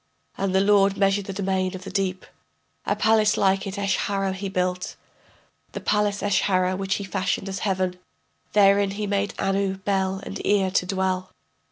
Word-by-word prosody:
And 190 -1 -1
the 190 - +5
lord 200 -1 +4
measured 195 0 +2
the 195 - -5
domain 190 -1 -1
of 185 - -8
the - - -7
deep, 190 -2 -2 0.6
A - - +2
palace 220 -1 +3
like 195 0 +2
it, 195 +1 -5
Eshara, 195 -1 0
he 195 +1 -4
built, 180 -1 -2 0.8
The - - -4
palace 210 -1 0
Eshara 185 -2 +2
which 195 0 -1
he 200 - -4
fashioned 190 0 -2
as 195 0 -4
heaven. 185 -2 -1 0.5
Therein 200 -1 +4
made 200 0 -1
he - - -22
Anu, 195 0 0
Bel, 190 -1 -1
and 195 - -6
Ea 195 -2 +2
to 180 - +1
dwell. 185 -1 -1
195 Hz, 170 wpm, -24 LUFS, 190-200 Hz, 0.8 s, the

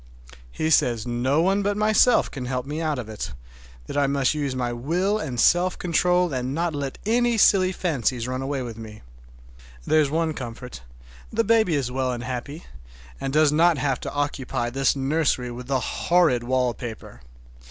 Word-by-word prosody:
He 155 - -2
says 120 -7 +2
no 130 +6 +1
one 195 +2 +2
but 205 +1 -1
myself 215 +3 +3
can 130 -4 -6
help 125 0 -3
me 150 +3 -4
out 155 -3 -1
of 120 -3 -5
it, 105 -7 -6 0.5
that - - -7
I 145 -1 +2
must 140 -1 +1
use 145 -3 -2
my 120 -1 -2
will 175 - 0
and 130 - -4
self 180 +6 +3
control 180 -1 +1
and 130 +1 -2
not 170 0 -1
let 140 -2 -4
any 240 +1 +2
silly 185 -3 +4
fancies 130 - -1
run 130 +1 -3
away 135 -1 -3
with 115 -2 -7
me. 110 -1 -10 0.8
There's 155 -2 +3
one 160 +1 0
comfort, 125 - -8 0.5
the 230 +1 +1
baby 220 -6 +3
is 130 -4 -1
well 130 0 -1
and 120 -1 -5
happy, 130 +6 -6 0.5
and 135 - -3
does 150 0 +4
not 165 +1 +4
have 135 -2 -1
to - - -6
occupy 140 -4 -2
this 135 +2 +1
nursery 135 -3 0
with 125 +1 -8
the 135 -1 +1
horrid 160 -2 +1
wallpaper. 120 - -3
140 Hz, 175 wpm, -24 LUFS, 125-170 Hz, 0.8 s, silly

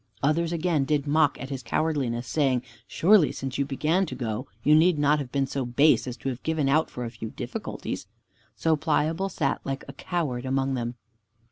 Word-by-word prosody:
Others 160 +3 +2
again 170 -3 +1
did 145 0 0
mock 150 0 +2
at 135 +1 -7
his 135 -2 -4
cowardliness, 130 -4 -1
saying, 130 -5 +1 0.2
"Surely 190 -3 +4
since 135 +1 -5
you 140 - +2
began 155 +7 +1
to - - -5
go, 110 -4 -3 0.2
you 150 - +5
need 160 +2 +5
not 145 +1 +3
have 130 -4 -5
been 140 -1 +1
so 135 0 -3
base 130 +4 +3
as 125 0 -5
to 135 - -3
have 130 -1 -5
given 160 -3 0
out 155 +4 +3
for 125 - -5
a 115 - -5
few 115 -1 -7
difficulties." - - -5 0.5
So 160 -1 +2
Pliable 160 +4 0
sat 150 -6 -1
like 135 0 -4
a - - -8
coward 150 -9 -2
among 135 0 0
them. 120 -1 -3
140 Hz, 200 wpm, -26 LUFS, 130-160 Hz, 0.5 s, you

